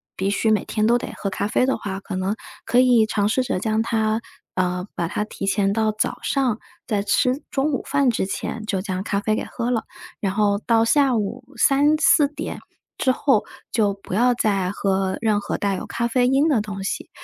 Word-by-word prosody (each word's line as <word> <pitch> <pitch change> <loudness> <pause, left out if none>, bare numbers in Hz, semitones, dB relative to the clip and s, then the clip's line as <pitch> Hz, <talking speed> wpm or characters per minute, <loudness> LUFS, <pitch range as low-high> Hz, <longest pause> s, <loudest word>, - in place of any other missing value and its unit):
必 190 +1 -1
须 215 +2 +1
每 210 -3 +2
天 215 -1 -1
都 240 +2 +4
得 - - -6
喝 195 - -3
咖 200 - -1
啡 250 - +2
的 265 - +1
话， 195 -3 -5
可 195 - -6
能 190 +3 -1 0.3
可 245 - +3
以 245 -3 +5
尝 205 -1 +1
试 220 +5 +1
着 250 -7 -1
将 220 +1 0
它 220 -1 0 0.3
呃， 180 0 -1
把 170 - -2
它 210 - -2
提 195 -2 -6
前 200 -1 +2
到 220 -1 +1
早 215 - -2
上， 255 -6 0 0.3
在 210 -4 0
吃 250 +7 +1
中 280 +3 0
午 - - 0
饭 280 -3 +3
之 205 - -1
前 220 +3 -4
就 195 -3 0
将 185 -1 -3
咖 200 0 -1
啡 215 +1 0
给 - - -2
喝 240 0 -3
了。 230 -3 -1 0.3
然 195 - -1
后 205 -1 +2
到 230 -1 +4
下 270 +1 +3
午 205 -2 -3
3-4 290 +1 +4
点 290 - -6 0.4
之 260 - +3
后， 255 -4 +2 0.3
就 205 -4 +1
不 195 - -9
要 245 +4 +3
再 195 -5 +1
喝 190 -1 0
任 215 -2 +2
何 - - -3
带 200 -1 0
有 - - -6
咖 235 - -1
啡 245 +1 +2
因 275 +4 +3
的 255 -9 +3
东 195 -2 -6
西， 195 - -4
215 Hz, 225 characters per minute, -22 LUFS, 200-245 Hz, 0.4 s, 以